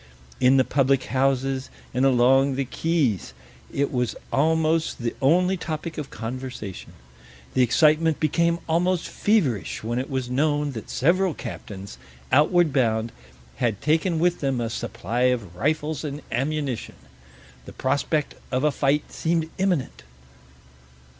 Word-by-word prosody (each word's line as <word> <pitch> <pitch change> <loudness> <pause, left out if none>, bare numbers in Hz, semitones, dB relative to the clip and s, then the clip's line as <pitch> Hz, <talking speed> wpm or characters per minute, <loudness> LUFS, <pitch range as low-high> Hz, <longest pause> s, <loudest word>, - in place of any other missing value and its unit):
In 130 +2 +5
the 130 - +5
public 135 -1 +2
houses 135 0 +1 0.2
and 130 +2 +2
along 135 +2 +4
the 135 0 -1
quays 140 - 0 0.4
it 140 0 0
was 125 -3 -1 0.2
almost 160 +2 +2
the 115 - -1
only 180 +7 +3
topic 160 -1 -5
of 145 - -5
conversation. 120 -4 -6 0.6
The 130 - +3
excitement 155 +5 +3
became 170 +2 +2
almost 175 +2 +1
feverish 155 - 0
when 120 +2 -1
it 130 - -4
was 130 -2 -2
known 145 +3 +1
that 115 -5 -8
several 175 +4 +2
captains, 100 -4 -8 0.3
outward 155 +2 +4
bound, 115 -3 +1 0.5
had 110 -5 0
taken 160 +3 +1
with 175 +2 +2
them 135 -3 0
a 115 -1 -2
supply 120 +6 -2
of 105 -9 -3
rifles 150 - -1
and 145 0 -5
ammunition. 135 0 -2 0.7
The - - -10
prospect 140 +3 0 0.2
of 130 +1 0
a 150 - +3
fight 140 +1 0
seemed 165 -1 -1
imminent. 180 - 0
140 Hz, 135 wpm, -24 LUFS, 125-160 Hz, 0.7 s, In